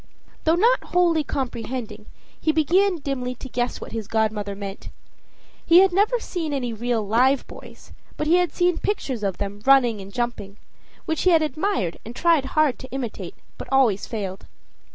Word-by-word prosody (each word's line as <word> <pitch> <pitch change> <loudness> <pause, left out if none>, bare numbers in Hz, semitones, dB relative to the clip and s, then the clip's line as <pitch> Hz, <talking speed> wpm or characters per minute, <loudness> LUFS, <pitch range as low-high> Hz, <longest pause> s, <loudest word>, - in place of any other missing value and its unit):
Though 320 +1 +4
not 470 +8 +3
wholly 340 -3 +2
comprehending, 250 -3 -5 0.3
he 315 - +2
began 350 +5 +2
dimly 255 -3 -3
to 265 - -9
guess 245 -1 -2
what - - -9
his 220 -3 -5
godmother 215 -2 -1
meant. 195 -1 -7 0.7
He 340 +2 +7
had 385 -2 +3
never 425 +6 +2
seen 330 -8 -4
any 250 -4 -2
real 230 -1 -1
live 255 +6 +3
boys, - - -13 0.3
but 300 - -2
he 335 +3 +4
had 355 -3 +1
seen 355 -1 +1
pictures 270 - -2
of 195 -3 -2
them 205 0 -5
running 245 -5 +4
and 195 +1 -10
jumping; 225 -4 -4 0.5
which 320 -2 -1
he 370 - +4
had 325 -3 +5
admired 310 - -1
and 230 +2 -9
tried 330 -4 +3
hard 305 -5 +3
to 260 - -10
imitate 250 -4 -5 0.2
but - - -7
always 245 -7 +3
failed. 195 -4 -5
260 Hz, 175 wpm, -23 LUFS, 220-330 Hz, 0.7 s, He